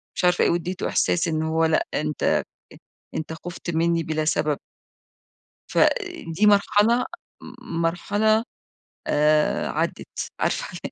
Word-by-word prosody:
مش - - 0
عارفة 180 0 +4
إيه - - +3
واديته 175 +2 -2
إحساس 175 0 +1
إن 160 -1 0
هو 160 +1 +1
لأ، 160 -1 +1
أنت 150 0 0 0.7
أنت 160 0 -4
خفت 175 +2 -7
مني 165 0 +2
بلا 155 0 -2
سبب. 150 -2 +1 1.1
فدي 165 +5 +1
مرحلة 210 +4 +4 0.4
م 165 - -7
مرحلة، 205 +6 +1 0.6
آآ 150 +1 +2
عدت، - - -3
عارفة - - 0 0.2
ال - - -4
165 Hz, 120 wpm, -24 LUFS, 160-185 Hz, 1.1 s, عارفة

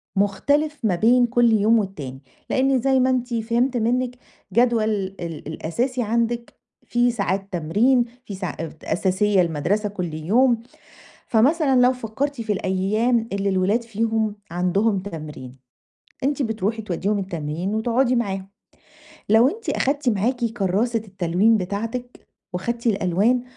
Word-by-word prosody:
مختلف 285 +10 +1
ما 195 -5 +2
بين 240 +6 +4
كل 240 -1 +3
يوم 220 +2 +4
والتاني، 145 -10 -5 0.3
لإن 265 0 +2
زي 265 +1 +3
ما 255 +1 +3
أنتِ 250 -1 -1
فِهِمت 235 +3 0
منِك 250 +2 0 0.4
جدول 235 -2 +3
ال 190 -7 -3
الأساسي 240 - -2
عندِك 235 +1 -1 0.3
فيه 240 0 +2
ساعات 195 -3 -2
تمرين، 215 +10 +2 0.2
فيه 200 - -6
ساع 185 -5 -5 0.3
أساسية 190 +1 +2
المدرسة 175 +6 0
كل 180 -5 -4
يوم. 225 +10 +2 0.7
فمثلًا 270 +3 +3
لو 250 +1 +5
فَكّرتِ 255 +3 -3
في 215 -2 -1
الأيام 215 +5 0
اللي 200 0 0
الولاد 195 +5 +1
فيهم 225 -1 -1 0.2
عندهم 190 +4 +1
تمرين، 150 -8 -8 0.7
أنتِ 285 +1 0
بتروحي 225 -2 -1
تودّيهم 205 +1 -1
التمرين 175 +1 -3
وتقعدي 240 +3 +2
معاهم. 195 -5 -2 0.8
لو 225 +4 +6
أنتِ 450 +8 -6
أخدتِ 280 0 +1
معاكِ 235 +4 0
كراسة 225 +1 0
التلوين 190 +4 +2
بتاعتِك 225 +6 -5 0.3
وخَدتِ 235 +6 -2
الألوان 205 +4 +2
220 Hz, 125 wpm, -22 LUFS, 190-245 Hz, 0.8 s, لو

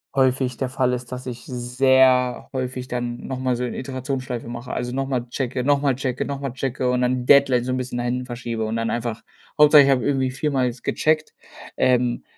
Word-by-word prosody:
häufig 130 -2 +1
der 130 - -2
Fall 130 -1 +1
ist, 125 0 -5
dass 125 0 -6
ich 120 -1 -7
sehr 125 0 +2
häufig 130 -1 -4
dann 120 -1 -4
noch 130 - -4
mal 130 -1 0
so 125 - -3
'ne 125 - -4
Iterationsschleife 130 -2 -4
mache. 120 +1 -6
Also, 125 - -3
noch 135 +2 -1
mal 125 -3 -2
checke, 125 0 -2
noch 140 +1 +2
mal 140 -3 +2
checke, 130 -1 -2
noch 140 -1 -4
mal 135 -2 -3
checke 130 -1 -2
und 125 0 +1
dann 125 0 0
Deadlines 130 -3 +5
so 130 - 0
'n - - -1
bisschen 125 -1 -4
nach 120 - -2
hinten 125 +1 -2
verschiebe 120 -2 -4
und 110 +1 -3
dann 115 0 -1
einfach 115 -1 -3 0.4
Hauptsache 150 -1 +8
ich 140 - +2
habe 130 -2 +3
irgendwie 135 -2 0
viermal 135 -1 0
jetzt 125 -1 -4
gecheckt, 155 0 0 0.4
ähm, 125 -1 +2
125 Hz, 220 wpm, -22 LUFS, 125-135 Hz, 0.4 s, Hauptsache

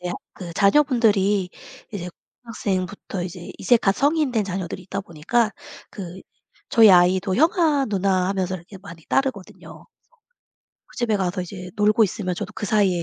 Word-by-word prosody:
대학 180 0 -4 0.2
그 175 -2 -8
자녀분들이 205 - +3 0.4
이제 180 -3 -5 0.4
고등학생부터 195 -4 -4
이제 175 -1 -8
이제 240 +6 +4
갓 195 -4 +2
성인 295 -1 +2
된 220 -3 0
자녀들이 185 -1 -5
있다 195 +2 -4
보니까 205 +5 0 0.4
그 185 -1 -8 0.5
저희 225 -3 +7
아이도 185 +1 +4
"형아, 310 -3 +3
누나!" 190 -2 +1
하면서 190 -1 -1
이렇게 180 +4 -13
많이 175 -4 -13
따르거든요. 260 -8 -3
그래서 - - -28 1.0
그 - - -19
집에 235 -4 +1
가서 185 -1 -2
이제 180 0 -8
놀고 210 +2 +4
있으면 185 -2 -3
저도 - - -6
그 210 - -4
사이에 195 -5 +2
195 Hz, 355 characters per minute, -22 LUFS, 180-220 Hz, 1.0 s, 저희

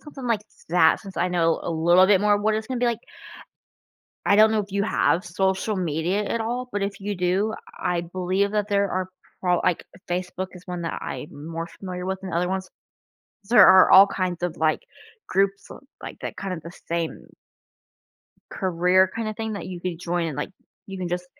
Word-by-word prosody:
something 275 -4 -9
like 230 -3 +1 0.3
that, 160 -2 +4
since 195 -3 -11
I 175 +2 +1
know 165 -2 +2
a - - -3
little 175 +3 +5
bit 195 -2 +4
more 210 0 +4
of 205 - -1
what 215 +1 +2
it's 220 0 -3
gonna 255 0 -3
be 245 - +1
like 235 -1 -1 1.2
I 200 - +4
don't 215 +1 +6
know 220 - +2
if 200 -1 -7
you 200 0 +1
have 185 -4 +1
social 190 +4 -1
media 175 +3 -1
at 230 - -2
all, 245 +3 -3
but 205 -3 -2
if 200 0 -3
you 205 +1 -3
do, 185 +5 0 0.2
I 175 -1 -1
believe 185 +3 -1
that 210 -1 0
there 200 -1 +1
are 185 0 -2 0.3
pro 180 -1 +2
like, 175 - 0 0.2
Facebook 180 +1 -3
is 180 0 -13
one 180 -2 -5
that 165 - -4
I'm 150 +1 -7
more 165 0 -4
familiar 180 0 -7
with 190 0 -3
than 190 -2 -7
other 175 +1 0
ones. 190 0 -3 0.8
There 245 - +8
are 190 0 +7
all 195 +2 +9
kinds 185 -3 -3
of, 175 -2 -2
like, 155 0 +1 0.5
groups, 195 +1 0 0.3
like, - - -8
that - - -6
kind 195 -2 -4
of 165 - -8
the 170 - -9 0.2
same 170 -1 -3 1.2
career 185 0 +2
kind 225 -1 -3
of 215 - -5
thing 220 -1 -3
that 200 - -6
you 180 -2 -7
could 175 -2 -4
join 175 -1 -1
and, 155 -4 -5
like, 145 - -3 0.4
you 195 -1 -7
can 180 -1 -3
just, 180 +1 -3
185 Hz, 210 wpm, -24 LUFS, 175-205 Hz, 1.2 s, all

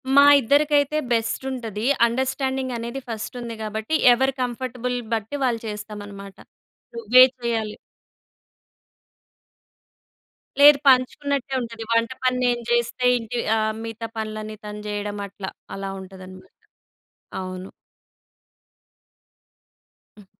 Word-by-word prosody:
మా 280 - +9 0.2
ఇద్దరికైతే 290 +3 +2
బెస్టుంటది. 230 -1 -2 0.2
అండర్‌స్టాం‌డింగనేది 260 0 -2
ఫస్టుంది 230 +1 -5
గాబట్టి, 220 +7 -2 0.2
ఎవరి 265 +2 +1
కంఫర్టబుల్ 250 0 -3 0.2
బట్టి 225 +6 -2
వాళ్ళు 235 -3 0
చేస్తామనమాట. 205 -2 -8 0.6
నువ్వే 235 +3 +7 0.2
చెయ్యాలి 225 -3 -2 2.8
లేదు. 290 0 +9
పంచుకున్నట్టే 270 +1 +1
ఉంటది. 230 -1 -6
వంట 230 +1 +2
పని 255 0 +2
నేను 240 -1 +1
చేస్తే 240 +1 0
ఇంటి 230 +1 -4 0.2
అహ్, 220 0 0
మిగతా 225 0 -6
పనులన్నీ 215 0 -5
తను 210 0 -7
జెయడం 205 0 -4
అట్లా. 195 -1 -7 0.2
అలా 195 0 -5
ఉంటదనమాట. 185 0 -12 0.9
అవును. 185 0 -7 2.5
హ్మ్. 205 -2 -16
230 Hz, 90 wpm, -23 LUFS, 210-255 Hz, 2.8 s, మా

